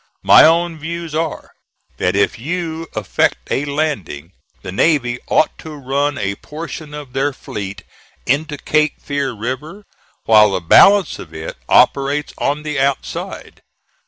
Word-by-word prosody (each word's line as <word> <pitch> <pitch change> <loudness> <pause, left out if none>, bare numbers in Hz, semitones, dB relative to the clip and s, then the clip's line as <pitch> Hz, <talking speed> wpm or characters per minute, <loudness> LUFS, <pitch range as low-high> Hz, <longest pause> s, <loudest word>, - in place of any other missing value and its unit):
"My - - +8
own 165 0 +2
views 165 +1 -5
are, 160 0 -3 0.5
that 90 +1 0
if 100 +2 +1
you 165 +3 -4
effect 110 -3 +1
a 140 - 0
landing, 140 - -3 0.3
the - - -6
navy 120 - +1
ought 155 - +2
to 155 -1 -9
run 140 +1 -1
a 100 -3 -2
portion 155 -1 -8
of 145 -4 -9
their 135 +2 0
fleet 100 -6 -7 0.4
into 150 +3 0
Cape 155 0 0
Fear 140 -2 -3
River, 130 - -6 0.4
while 105 -1 +6
the 95 - 0
balance 195 - +5
of 80 -2 -11
it 80 0 -6
operates 140 +2 +3
on 145 +2 -1
the 150 -2 -3
outside. 140 0 -3
145 Hz, 140 wpm, -18 LUFS, 120-155 Hz, 0.5 s, My